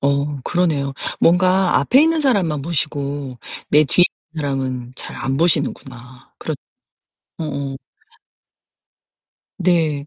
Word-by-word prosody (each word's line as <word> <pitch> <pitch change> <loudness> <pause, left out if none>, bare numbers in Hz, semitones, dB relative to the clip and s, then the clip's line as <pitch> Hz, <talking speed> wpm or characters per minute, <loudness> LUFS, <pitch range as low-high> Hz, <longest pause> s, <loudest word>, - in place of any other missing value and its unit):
어 140 0 0
그러네요. 155 -6 0 0.3
뭔가 185 +2 +4
앞에 265 +3 +4
있는 325 0 +3
사람만 190 - +1
보시고 145 -4 -3 0.3
내 150 - +6
뒤에 175 +5 +4 0.3
있는 160 - -4
사람은 130 -3 -3
잘 - - -6
안 135 0 -2
보시는구나. 135 -5 -2
그렇 155 - -3 0.8
어어. 140 -3 -4 1.8
네. 160 -5 +1
145 Hz, 220 characters per minute, -20 LUFS, 140-175 Hz, 1.8 s, 내